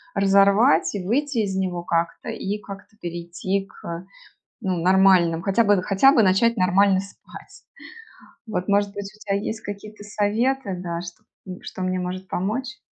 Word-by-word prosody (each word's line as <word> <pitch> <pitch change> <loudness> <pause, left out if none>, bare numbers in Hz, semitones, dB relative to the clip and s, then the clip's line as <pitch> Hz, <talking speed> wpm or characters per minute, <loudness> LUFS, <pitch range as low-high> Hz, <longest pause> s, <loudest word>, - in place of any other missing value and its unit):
разорвать. 200 +5 +4
И 190 - -3
выйти 270 +4 0
из 200 -3 -1
него 180 -2 -2
как-то 170 -1 -2
и 200 +2 -3
как-то 200 +1 -11
перейти 175 +3 -3
к 170 +1 -8 0.6
ну 185 -1 0
нормальным, 185 -2 +4
хотя 200 +5 +2
бы, 200 -3 +3
хотя 210 +9 +4
бы 230 -7 +4
начать 195 +5 +3
нормально 190 +1 +3
спать. 195 - -14 0.8
Вот 195 -4 -3
может 200 0 +2
быть 200 -1 -6
у 215 - -21
тебя 200 -2 -2
есть 215 +2 -4
какие-то 205 +1 -8
советы, 210 +2 0
да, 170 -1 -4
что 175 -1 -10 0.4
что 185 - -8
мне 185 0 -1
может 185 +1 -5
помочь? 250 +8 -3
195 Hz, 155 wpm, -23 LUFS, 185-210 Hz, 0.8 s, разорвать